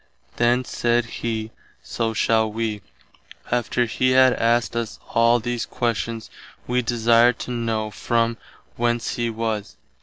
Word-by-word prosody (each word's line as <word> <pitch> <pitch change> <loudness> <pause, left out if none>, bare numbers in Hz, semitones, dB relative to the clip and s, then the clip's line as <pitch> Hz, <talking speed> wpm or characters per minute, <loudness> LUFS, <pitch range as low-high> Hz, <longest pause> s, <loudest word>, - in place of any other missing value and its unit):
Then 120 +2 +2
said 120 0 +1
he, 110 -1 -4 0.3
So 115 -1 -2
shall 110 0 +2
wee. 110 -1 -3 0.7
After 120 0 +1
he 130 +2 +1
had 130 -1 +6
asked 120 0 +1
us 115 -1 -3
all 115 +1 +4
these 120 0 -3
questions 115 -1 -2 0.3
wee 125 +1 +1
desired 120 0 +3
to - - -5
know 115 -3 -2
from 115 +2 0 0.4
whence 120 0 0
he 120 -1 -1
was. 110 -6 -3
115 Hz, 130 wpm, -23 LUFS, 115-120 Hz, 0.7 s, had